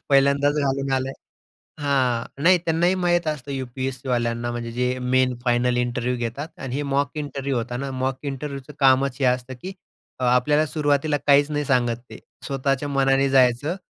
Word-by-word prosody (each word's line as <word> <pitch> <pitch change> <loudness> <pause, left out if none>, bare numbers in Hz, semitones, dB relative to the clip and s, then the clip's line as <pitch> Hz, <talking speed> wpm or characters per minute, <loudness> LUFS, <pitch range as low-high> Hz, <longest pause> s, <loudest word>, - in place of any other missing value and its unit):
पहिल्यांदाच 140 +1 +4
घालून 135 0 -1
आलाय 130 0 0 0.7
हां, 130 -5 +1 0.2
नाही. 180 +2 +6
त्यांनाही 170 +3 +2
माहीत 175 -1 +2
असतं, 145 -3 -3
यू-पी-एस-सी 130 0 -4
वाल्यांना. 120 0 -1
म्हणजे 120 -1 -5
जे 125 +1 -1
मेन 125 0 +1
फायनल 120 0 +2
इंटरव्ह्यू 125 0 -1
घेतात. 120 +6 -4
आणि 130 -1 -5
हे 145 - -1
मॉक 140 -1 +1
इंटरव्ह्यू 140 -2 -3
होता 120 +1 -3
ना, 135 +2 -4
मॉक 130 0 -2
इंटरव्ह्यूचं 140 +1 -7
कामच 135 -1 +3
हे 135 - +2
असतं, 125 +1 0
की 190 +1 -6 0.5
आपल्याला 125 +5 +3
सुरुवातीला 145 -1 +1
काहीच 145 +1 +5
नाही 150 0 -1
सांगत. 120 -3 +1
ते - - -10 0.3
स्वतःच्या 135 +1 -1
मनाने 135 0 +2
जायचं. 135 +4 +3
135 Hz, 160 wpm, -23 LUFS, 125-145 Hz, 0.7 s, नाही